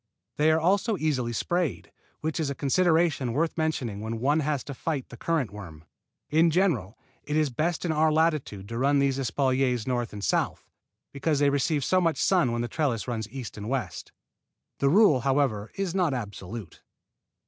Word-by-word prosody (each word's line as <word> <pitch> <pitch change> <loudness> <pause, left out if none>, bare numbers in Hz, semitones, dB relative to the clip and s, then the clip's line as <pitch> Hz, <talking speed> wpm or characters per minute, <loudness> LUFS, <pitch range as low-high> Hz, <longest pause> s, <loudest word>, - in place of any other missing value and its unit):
They 150 +1 +4
are 160 0 +4
also 200 +5 +2
easily 135 -7 0
sprayed, 175 +4 -2 0.3
which 160 +1 -2
is 155 -3 0
a 140 - -3
consideration 160 -3 +2
worth 160 +5 0
mentioning 135 -10 -2
when 110 +1 -4
one 145 +6 +2
has 145 -2 -1
to 140 - -7
fight 140 0 -3
the - - -10
currant 155 -3 -1
worm. 85 -7 -10 0.5
In 160 +2 +5
general, 160 - +1 0.2
it 150 - -4
is 155 -3 +2
best 155 +7 -1
in 170 - +1
our 155 0 +3
latitude 155 -11 0
to 115 0 -4
run 140 +2 +3
these 140 -1 +1
espaliers 130 -1 +1
north 120 -2 -1
and 105 -1 -7
south, - - -1 0.4
because 145 +2 0
they 140 0 +3
receive 145 0 0
too 185 0 +3
much 165 -2 +1
sun 175 -10 +2
when 120 0 -1
the - - -2
trellis 130 -6 -1
runs 110 -3 -3
east 125 -2 -7
and 105 +1 -5
west. 125 -9 -3 0.7
This 140 - +3
rule, 185 -5 +5
however, 130 -5 0
is 195 -3 -2
not 175 -7 +1
absolute. 105 -3 -7
140 Hz, 180 wpm, -27 LUFS, 120-160 Hz, 0.7 s, In